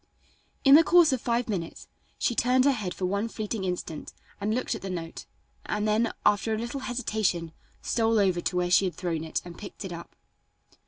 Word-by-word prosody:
In 275 - +7
the 315 +3 +9
course 340 -4 +5
of 255 - -1
five 235 0 0
minutes 180 -7 -4 0.3
she - - 0
turned 250 +2 +3
her 285 - +6
head 210 -8 -3
for 185 - -3
one 200 +4 0
fleeting 215 -2 -4
instant 180 -4 -4 0.3
and 205 +1 -1
looked 255 - -1
at - - -6
the 195 - -5
note, 165 -3 -6 0.4
and 210 0 -1
then, 220 +2 +2
after 215 +2 +3
a - - -3
little 235 +5 -4
hesitation, 215 -10 -1 0.3
stole 225 -1 +1
over 185 -4 +2
to 180 - -2
where 180 0 0
she 180 +2 +5
had 180 -4 -3
thrown 170 -3 -3
it 160 - -3
and 175 -1 -10
picked 205 0 -8
it 185 - -5
up. 170 0 -10
210 Hz, 205 wpm, -27 LUFS, 180-235 Hz, 0.4 s, the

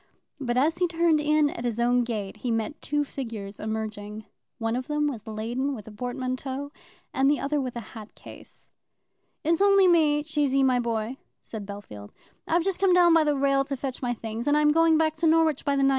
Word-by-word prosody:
But 245 -3 -2
as 320 +6 +2
he 360 - +3
turned 335 -2 +2
in 300 -1 +2
at 235 - -7
his 235 -2 -2
own 245 +1 +3
gate 215 -4 -4
he 245 - -4
met 225 +7 -2
two 295 0 0
figures 225 -8 -7
emerging; 215 -1 -5 0.3
one 225 -1 -1
of 255 0 -4
them 295 0 0
was 235 -6 -5
laden 240 +6 -2
with 215 -3 -10
a - - -9
portmanteau, 255 +4 -4 0.4
and 270 +1 +3
the 290 - +2
other 290 +1 -1
with 255 -2 -5
a 235 - -4
hat 220 -2 -11
case. - - -15 0.7
"It's 330 +3 +1
only 395 -1 +5
me, 305 -4 +3
Cheesy, 290 -3 +1
my 255 -2 +3
boy," 230 +1 -2 0.3
said 210 -3 -8
Bellfield. 110 - -9 0.4
"I've 335 +1 +2
just 390 0 -1
come 385 -2 +4
down 350 -2 +6
by 325 -1 +5
the 295 -2 +1
rail 275 0 +2
to 275 0 -4
fetch 260 -1 -5
my 245 -1 -1
things, 225 +3 -6
and 290 +1 +4
I'm 300 0 +4
going 325 0 +4
back 315 -1 +2
to 325 +1 +1
Norwich 320 -2 +3
by 280 -2 +1
the 275 - +2
9.20. 270 - +5
270 Hz, 215 wpm, -26 LUFS, 230-300 Hz, 0.7 s, down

